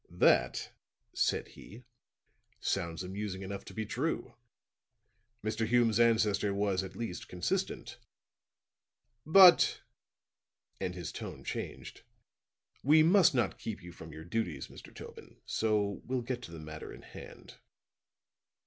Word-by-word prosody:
"That," 60 Hz, -, +2 dB, 0.4 s
said -, -, 0 dB
he, 115 Hz, +5 st, -13 dB, 0.8 s
"sounds 85 Hz, -2 st, -2 dB
amusing 95 Hz, +1 st, -5 dB
enough 100 Hz, +1 st, -6 dB
to -, -, -10 dB
be 110 Hz, -1 st, -2 dB
true. 130 Hz, +10 st, -2 dB, 1.1 s
Mr. 110 Hz, +1 st, -1 dB
Hume's 115 Hz, -2 st, +3 dB
ancestor 110 Hz, -4 st, +3 dB
was 100 Hz, -2 st, +1 dB
at 95 Hz, -, -8 dB
least 115 Hz, -7 st, -5 dB
consistent. 90 Hz, -1 st, -3 dB, 1.3 s
But," 180 Hz, +2 st, +8 dB, 1.0 s
and 90 Hz, -, -3 dB
his 90 Hz, -2 st, -5 dB
tone -, -, -7 dB
changed, -, -, -6 dB, 0.8 s
"we 155 Hz, +3 st, +6 dB
must 175 Hz, -2 st, +5 dB
not 120 Hz, -6 st, 0 dB
keep 110 Hz, -5 st, -6 dB
you 90 Hz, -, -9 dB
from 80 Hz, -1 st, -11 dB
your 80 Hz, +2 st, -9 dB
duties, 85 Hz, -8 st, -3 dB
Mr. -, -, -12 dB
Tobin, -, -, -10 dB
and -, -, -23 dB
so 105 Hz, -2 st, 0 dB
we'll 125 Hz, -1 st, -1 dB
get 125 Hz, 0 st, -3 dB
to 85 Hz, -, -9 dB
the 85 Hz, -, -8 dB
matter 80 Hz, 0 st, -8 dB
in -, -, -12 dB
hand." -, -, -12 dB
105 Hz, 130 wpm, -32 LUFS, 90-120 Hz, 1.3 s, But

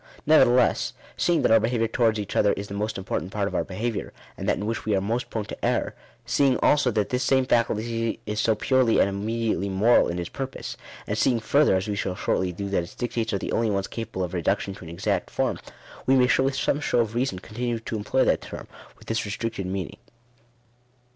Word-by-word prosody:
Nevertheless, 125 Hz, -6 st, +4 dB, 0.2 s
seeing 170 Hz, -5 st, +2 dB
that -, -, +3 dB
our 115 Hz, -, +7 dB
behaviour 115 Hz, +1 st, +1 dB
towards 115 Hz, -1 st, +2 dB
each 100 Hz, -, -5 dB
other 105 Hz, -, +4 dB
is 100 Hz, +1 st, -5 dB
the 100 Hz, -, -7 dB
most 105 Hz, +2 st, -2 dB
important 95 Hz, -1 st, -3 dB
part 100 Hz, -1 st, -1 dB
of -, -, -5 dB
our -, -, +1 dB
behaviour, 110 Hz, +4 st, -3 dB, 0.2 s
and -, -, -3 dB
that -, -, +2 dB
in 105 Hz, -, -4 dB
which 115 Hz, +1 st, -2 dB
we 105 Hz, -2 st, +1 dB
are -, -, +2 dB
most 115 Hz, +6 st, -2 dB
prone 110 Hz, -2 st, -3 dB
to -, -, -9 dB
err; -, -, 0 dB, 0.3 s
seeing 135 Hz, -3 st, +3 dB
also 145 Hz, -4 st, +3 dB
that 105 Hz, -3 st, 0 dB
this 125 Hz, 0 st, 0 dB
same 130 Hz, -1 st, +3 dB
faculty 115 Hz, -1 st, 0 dB
is 105 Hz, 0 st, -3 dB
so 110 Hz, 0 st, +3 dB
purely 130 Hz, +1 st, +2 dB
and -, -, +5 dB
immediately 105 Hz, -1 st, -1 dB
moral 105 Hz, +6 st, +4 dB
in 85 Hz, -, -3 dB
its 85 Hz, -1 st, -3 dB
purpose; 135 Hz, +5 st, -6 dB, 0.3 s
and -, -, -2 dB
seeing 120 Hz, -3 st, +3 dB
further, 140 Hz, +1 st, +3 dB
as 95 Hz, +3 st, -1 dB
we 105 Hz, -, -1 dB
shall 95 Hz, -2 st, -2 dB
shortly 90 Hz, 0 st, 0 dB
do, 100 Hz, +3 st, -5 dB
that 100 Hz, -2 st, +1 dB
its 85 Hz, -, -10 dB
dictates 115 Hz, -2 st, -2 dB
are 100 Hz, -, 0 dB
the -, -, -4 dB
only 115 Hz, -1 st, +1 dB
ones 100 Hz, -1 st, 0 dB
capable 115 Hz, -4 st, -4 dB
of 90 Hz, 0 st, -4 dB
reduction 95 Hz, +3 st, 0 dB
to 95 Hz, -, -12 dB
an 80 Hz, -, -9 dB
exact 85 Hz, -, -1 dB
form, -, -, -1 dB, 0.5 s
we 135 Hz, -, +5 dB
may 125 Hz, -1 st, +5 dB
with 135 Hz, 0 st, +2 dB
some 140 Hz, +1 st, +1 dB
show 145 Hz, -, 0 dB
of 110 Hz, -1 st, -2 dB
reason 120 Hz, -5 st, -1 dB
continue 120 Hz, +5 st, -3 dB
to 115 Hz, 0 st, -5 dB
employ 110 Hz, +5 st, +1 dB
that -, -, +2 dB
term, -, -, -8 dB, 0.3 s
with -, -, -18 dB
this 115 Hz, -1 st, -1 dB
re 105 Hz, -, -5 dB
stricted 115 Hz, -2 st, -3 dB
meaning. 95 Hz, -3 st, -4 dB
110 Hz, 225 wpm, -25 LUFS, 100-120 Hz, 0.5 s, our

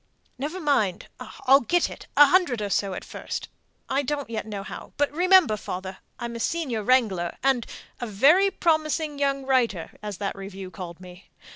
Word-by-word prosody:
"Never 305 Hz, +7 st, -4 dB
mind; 220 Hz, -, 0 dB
I'll 270 Hz, +1 st, +3 dB
get 345 Hz, +7 st, +1 dB
it -, -, -11 dB
a 290 Hz, -, +10 dB
hundred 290 Hz, -, +3 dB
or 205 Hz, -1 st, -3 dB
so 195 Hz, -2 st, 0 dB
at -, -, -7 dB
first -, -, -6 dB, 0.4 s
I 270 Hz, +1 st, +1 dB
don't 285 Hz, -2 st, -3 dB
yet 220 Hz, -1 st, -4 dB
know 205 Hz, -2 st, -5 dB
how -, -, -9 dB
but 290 Hz, -1 st, +1 dB
remember, 360 Hz, -, +5 dB
father, 190 Hz, 0 st, -6 dB, 0.2 s
I'm 235 Hz, 0 st, -5 dB
a -, -, -5 dB
senior 270 Hz, -5 st, -1 dB
wrangler, 210 Hz, -8 st, +1 dB
and 265 Hz, -4 st, +2 dB, 0.3 s
a 240 Hz, -, -4 dB
'very 290 Hz, -, +5 dB
promising 310 Hz, -4 st, 0 dB
young 275 Hz, -1 st, 0 dB
writer,' 235 Hz, -10 st, +1 dB
as 210 Hz, -3 st, -5 dB
that 200 Hz, 0 st, -3 dB
review 195 Hz, -1 st, -8 dB
called 175 Hz, -3 st, -8 dB
me. 180 Hz, 0 st, -14 dB
245 Hz, 175 wpm, -25 LUFS, 200-290 Hz, 0.4 s, a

